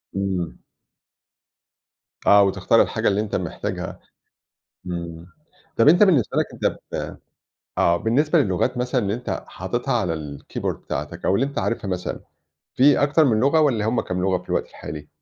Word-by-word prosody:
إمم. 95 -4 -2 1.7
آه، 100 0 +7
وتختار 95 - +3
الحاجة - - 0
اللي 100 +1 +2
أنتَ 105 - -3
محتاجها - - -4 0.9
إمم، 85 -1 -6 0.5
طب 115 - +5
أنتَ 175 +6 +6
بالنسبة 165 - +3
لكَ - - +2
أنتَ - - -1
ب - - -4 0.6
آه 85 - +4
بالنسبة 140 - +2
للغات 125 - +1
مثلًا 125 +1 0
اللي 100 -2 -1
أنتَ 120 +2 -4
حاطتها - - -3
على 85 - 0
الكيبورد 75 -3 -5
بتاعتك، 75 +5 -5
أو 95 - +3
اللي 125 +7 +2
أنتَ 140 - -5
عارفها 115 -3 -2
مثلًا، 90 -1 -3 0.5
في 140 +2 +5
أكتر 150 +2 +4
من 110 -5 +3
لغة 140 +6 +4
والّا 125 -9 +2
همّ 120 - +1
كام 90 0 -3
لغة 95 -1 +2
في - - -25
الوقت - - -1
الحالي؟ 75 0 -8
105 Hz, 160 wpm, -23 LUFS, 90-135 Hz, 1.7 s, آه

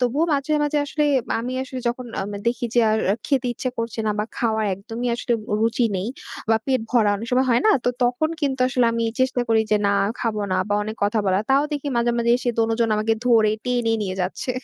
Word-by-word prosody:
তবুও 255 +6 +1
মাঝে 285 +2 0
মাঝে 295 0 +1
আসলে 300 +1 -1 0.4
আমি 250 +2 -4
আসলে 260 -1 -6
যখন 245 +1 -4
আম 200 +2 -4 0.2
দেখি 240 +1 0
যে 240 - +5
আর 220 - +2 0.3
খেতে 265 -3 +1
ইচ্ছা 255 +2 -3
করছে 230 -1 -4
না - - +2
বা 210 - +1
খাওয়ার 220 -2 0
একদমই 225 +5 -5
আসলে 240 0 -2 0.3
রুচি 230 +2 +2
নেই 185 +3 -3 0.4
বা 225 - +5
পেট 260 -2 +1
ভরা; 225 -4 +3
অনেক 225 +3 -6
সময় 260 +1 +2
হয় 235 - +4
না - - +6
তো - - +3 0.2
তখন 245 +6 +1
কিন্তু 270 -3 -1
আসলে 250 -1 +2
আমি 230 0 -1 0.2
চেষ্টা 260 -1 +1
করি 225 -1 +4
যে 210 - +5
না - - +3 0.3
খাবো 220 -3 -1
না - - +2
বা 205 - +1
অনেক 215 +1 -5
কথা 210 +2 +1
বলার। 190 +2 +2
তাও 275 +2 +5
দেখি 290 -1 -3
মাঝে 235 0 +2
মাঝে 235 0 +1
এসে 250 0 -3
দোনজন 225 0 +2
আমাকে 215 +1 +1
ধরে 225 -3 +4
টেনে 245 -2 +1
নিয়ে 185 -2 -3
যাচ্ছে। 185 +7 -3
235 Hz, 220 wpm, -22 LUFS, 220-255 Hz, 0.4 s, না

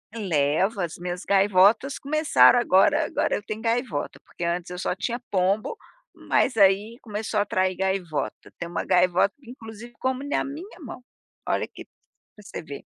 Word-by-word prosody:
Levo, 190 +1 0
as 170 -2 -4
minhas 175 +1 -5
gaivotas 200 +6 +3
começaram 305 -3 +4
agora 190 -5 +3
agora - - 0
eu - - -5
tenho 215 +1 -6
gaivota, 230 - -2
porque - - -8
antes 170 +1 -2
eu 180 - -6
só 180 - -1
tinha 235 +5 -3
pombo, 195 - 0 0.4
mas 225 - 0
aí 200 +3 +3
começou 215 -1 -3
a - - +3
atrair 185 -2 0
gaivota, 190 -5 -3
tem 170 - -5
uma 170 - -3
gaivota 180 +2 +3
inclusive 235 -1 -11
que - - -37
come 260 +2 -2
na 290 - 0
minha 340 +8 -9
mão, 255 -4 -9 0.4
olha - - 0
que, - - -12
para 210 - -24
você 195 - -8
ver. 145 -3 -9
205 Hz, 165 wpm, -25 LUFS, 180-235 Hz, 0.4 s, começaram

